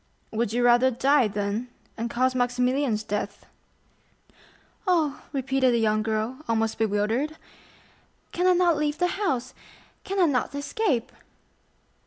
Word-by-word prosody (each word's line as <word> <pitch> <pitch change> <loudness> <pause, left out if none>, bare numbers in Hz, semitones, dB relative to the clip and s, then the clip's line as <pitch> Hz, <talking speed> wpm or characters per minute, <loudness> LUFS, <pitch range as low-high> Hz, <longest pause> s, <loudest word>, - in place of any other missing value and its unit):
"Would 225 -1 -1
you 240 +2 0
rather 245 +2 +5
die, 265 +1 +3
then, 205 +3 -3 0.3
and 230 +1 -3
cause 255 +2 +1
Maximilian's 250 -1 0
death?" 205 0 -4 1.4
"Oh," 320 -6 +1
repeated 270 -2 +1
the - - +2
young 215 -1 +2
girl, 220 +3 -2
almost 225 -1 0
bewildered, 225 +8 0 0.9
"can 360 +1 +1
I 365 - +6
not 350 -3 +3
leave 300 0 -1
the 355 +4 -1
house?—can 290 +6 -5
I 360 - +6
not 280 -2 0
escape?" 285 - -1
250 Hz, 125 wpm, -25 LUFS, 225-295 Hz, 1.4 s, I